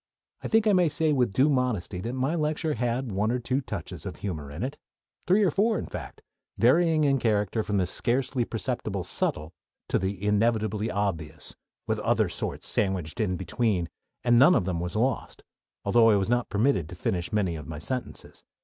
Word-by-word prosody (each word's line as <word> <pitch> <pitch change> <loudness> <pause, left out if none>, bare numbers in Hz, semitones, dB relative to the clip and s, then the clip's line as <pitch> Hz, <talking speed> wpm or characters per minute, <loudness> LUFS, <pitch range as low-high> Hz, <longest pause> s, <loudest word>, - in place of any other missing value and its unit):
I - - -4
think 225 -1 +3
I 210 - +4
may 180 -3 +4
say 155 0 +1
with 125 -6 +2
due 130 +8 +3
modesty 125 -11 0
that 115 +5 -4
my 130 +4 0
lecture 155 -1 0
had 120 0 -1
one 105 +3 0
or 125 - +1
two 125 +3 -1
touches - - -7
of - - -6
humor 80 -8 -5
in 75 +8 -5
it 140 +3 -4 0.5
three 195 +4 +4
or 185 - +3
four, 215 +6 +2
in - - -4
fact - - -8 0.3
varying 155 +5 +4
in 135 -2 +3
character 105 -1 +1
from 105 -1 -1
the 95 - +2
"scarcely 125 +6 0
perceptible 115 -4 -3
subtle" 75 +3 -2 0.4
to - - +2
the 95 +1 -3
"inevitably 110 0 +1
obvious," 85 -7 -3 0.3
with - - -1
other - - +1
sorts - - -4
sandwiched 95 -2 -1
in 95 -5 0
between, 95 -3 -1 0.3
and 120 -1 +5
none 150 +7 +7
of 90 - +1
them 90 -3 -1
was 90 +3 -4
lost; 125 +4 -1 0.4
although 115 +3 +5
I 105 - +5
was 100 +3 0
not 120 0 +1
permitted 105 - +1
to 90 - -8
finish 90 0 -2
many 95 -5 0
of 75 -2 -8
my 80 -1 -6
sentences. 125 - -5
115 Hz, 195 wpm, -27 LUFS, 95-135 Hz, 0.5 s, none